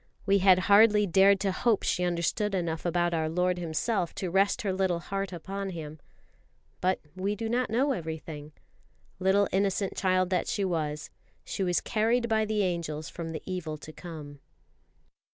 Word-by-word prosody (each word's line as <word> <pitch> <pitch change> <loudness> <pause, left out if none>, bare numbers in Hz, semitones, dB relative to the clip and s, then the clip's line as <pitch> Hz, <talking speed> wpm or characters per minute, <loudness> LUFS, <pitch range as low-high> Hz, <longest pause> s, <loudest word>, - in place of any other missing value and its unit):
We 200 0 +4
had 185 -1 +6
hardly 210 0 +6
dared 195 +2 +5
to 195 - +1
hope 220 +3 +1
she 180 - 0
understood 180 +4 0
enough 170 -2 -2
about 175 0 +1
our 160 -1 0
Lord 180 +2 0
Himself 175 +2 -1
to 185 -3 -3
rest 195 +2 +2
her 195 -2 0
little 190 -2 +1
heart 195 +2 -4
upon 195 +3 -5
Him. 155 -3 -7 0.8
But 185 +1 +1 0.2
we 195 +3 -1
do 225 +2 -4
not 245 +2 0
know 260 +6 +2
everything. 160 - -5 0.7
Little 195 +2 +3
innocent 195 0 0
child 185 -1 +1
that 180 - +1
she 200 - -1
was, 155 -4 -2 0.3
she - - -4
was 180 -2 +1
carried 235 +2 +1
by 220 -1 +2
the 210 -1 0
angels 165 -4 -3
from 165 -1 -6
the 155 -2 -6
evil 170 -5 -4
to 155 +1 -11
come. 150 -5 -9
185 Hz, 170 wpm, -28 LUFS, 165-200 Hz, 0.8 s, had